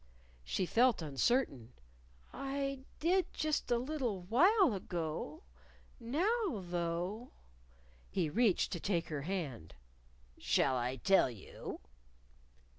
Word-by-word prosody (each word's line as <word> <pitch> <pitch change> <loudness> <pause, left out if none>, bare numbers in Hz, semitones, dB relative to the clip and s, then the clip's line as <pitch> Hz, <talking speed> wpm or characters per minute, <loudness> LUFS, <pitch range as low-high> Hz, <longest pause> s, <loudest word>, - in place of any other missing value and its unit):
She 180 - -1
felt 230 -1 +3
uncertain. 140 - 0 0.6
"I 275 0 -3 0.2
did 360 +2 +2
just 310 -1 -1
a 240 - +3
little 250 -6 -2
while 340 - +5
ago. 180 - -4 0.6
Now, 375 - +1
though 175 +5 -3 0.4
" 60 0 -29 0.2
He 175 -4 0
reached 210 +3 +2
to 175 - -3
take 170 -2 -1
her 150 -3 -3
hand. 140 - -4 0.6
"Shall 130 - +2
I 125 +1 -1
tell 190 +3 +4
you?" 110 -6 -8
195 Hz, 110 wpm, -34 LUFS, -, 0.6 s, while